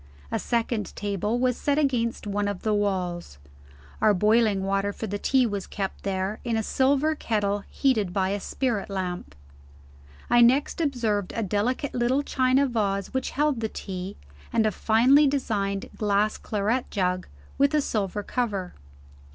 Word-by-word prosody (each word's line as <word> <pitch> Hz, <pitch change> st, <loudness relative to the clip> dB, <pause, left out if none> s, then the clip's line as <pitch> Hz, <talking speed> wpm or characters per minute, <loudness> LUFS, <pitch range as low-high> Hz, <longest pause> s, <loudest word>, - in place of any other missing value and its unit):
A -, -, 0 dB
second 230 Hz, -3 st, -1 dB
table 205 Hz, +2 st, -1 dB
was 250 Hz, 0 st, +1 dB
set 285 Hz, 0 st, 0 dB
against 245 Hz, -7 st, 0 dB
one 205 Hz, 0 st, -1 dB
of 200 Hz, -2 st, -4 dB
the 215 Hz, -, +1 dB
walls. 180 Hz, -, -2 dB, 0.6 s
Our 215 Hz, -1 st, +5 dB
boiling 210 Hz, 0 st, +3 dB
water 195 Hz, +1 st, 0 dB
for 220 Hz, -, -6 dB
the 205 Hz, -1 st, -4 dB
tea 265 Hz, +2 st, +3 dB
was 205 Hz, -4 st, -3 dB
kept 195 Hz, -2 st, -4 dB
there, 195 Hz, +1 st, -2 dB
in 230 Hz, -2 st, 0 dB
a 220 Hz, -, 0 dB
silver 280 Hz, +6 st, +2 dB
kettle 205 Hz, -7 st, -1 dB
heated 220 Hz, -9 st, +1 dB
by 190 Hz, 0 st, 0 dB
a 200 Hz, +1 st, -1 dB
spirit 220 Hz, -1 st, -2 dB
lamp. 180 Hz, -, -4 dB, 0.9 s
I 240 Hz, 0 st, +5 dB
next 265 Hz, +8 st, +3 dB
observed 225 Hz, -, 0 dB
a 230 Hz, -, -1 dB
delicate 220 Hz, +8 st, -1 dB
little 250 Hz, +4 st, +1 dB
china 260 Hz, 0 st, +2 dB
vase 205 Hz, -5 st, -1 dB
which 260 Hz, 0 st, -1 dB
held 295 Hz, -3 st, +1 dB
the 220 Hz, -1 st, -2 dB
tea, 190 Hz, -1 st, -6 dB, 0.3 s
and 225 Hz, -, +2 dB
a 215 Hz, -, +2 dB
finely 250 Hz, +9 st, +4 dB
designed 205 Hz, -8 st, -1 dB
glass 210 Hz, 0 st, +1 dB
claret 215 Hz, +4 st, -1 dB
jug, 185 Hz, -2 st, -1 dB, 0.3 s
with 280 Hz, +2 st, +4 dB
a -, -, +4 dB
silver 205 Hz, -5 st, -2 dB
cover. 200 Hz, -7 st, -2 dB
215 Hz, 160 wpm, -26 LUFS, 200-250 Hz, 0.9 s, Our